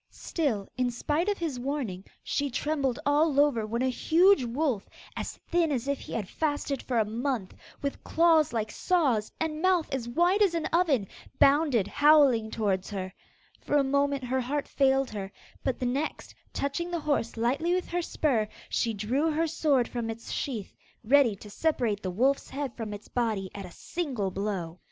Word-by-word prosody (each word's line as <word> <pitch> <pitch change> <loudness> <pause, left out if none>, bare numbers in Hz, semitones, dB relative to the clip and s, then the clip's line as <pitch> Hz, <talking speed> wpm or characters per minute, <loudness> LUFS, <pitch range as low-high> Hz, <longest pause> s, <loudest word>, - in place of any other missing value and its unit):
Still 245 - -2
in 250 -1 +1
spite 300 - -1
of 410 - 0
his 310 -7 -3
warning 245 -9 -3 0.2
she 285 0 -1
trembled 275 -1 -1
all 290 0 +3
over 255 -7 +3
when 235 +3 -1
a 260 - +2
huge 345 +6 +4
wolf, 245 -3 -1 0.3
as - - -5
thin 335 -2 +2
as 260 -2 -2
if 280 -1 0
he - - -9
had 210 -5 -2
fasted 290 0 -2
for 245 - -2
a 220 - +3
month, 230 -2 -2 0.3
with 280 - -3
claws 325 -3 +4
like 220 -2 -2
saws, 275 - +1
and 315 -1 -2
mouth 370 -3 +3
as 240 -3 -3
wide 350 - +2
as 380 -5 +4
an 330 - -1
oven, 300 - +2 0.3
bounded 275 - +4
howling 285 -7 +5
towards 195 -4 -1
her. 190 -2 -5 0.5
For 295 - 0
a 285 - +4
moment 280 0 +1
her 260 +1 0
heart 280 +4 -2
failed 270 -1 +2
her, 200 -2 -5 0.3
but 260 - 0
the 255 - -3
next, 275 +5 -2 0.2
touching 310 +5 -2
the 345 -2 -2
horse 285 -7 -1
lightly 280 +10 +1
with 365 - -2
her 350 +1 0
spur, 260 -10 0 0.2
she 230 -2 0
drew 250 +10 0
her 320 +2 +1
sword 295 -6 +1
from 235 -2 -4
its 225 0 -6
sheath, 230 -8 -4 0.3
ready 250 -2 +4
to 205 +2 -12
separate 235 -8 0
the 185 - -3
wolf's 260 +9 +1
head 275 -3 -4
from 225 -3 -5
its 205 0 -8
body 220 -6 -1
at 200 -2 -7
a - - -13
single 255 - -3
blow. 185 -4 -3
265 Hz, 185 wpm, -28 LUFS, 225-305 Hz, 0.5 s, howling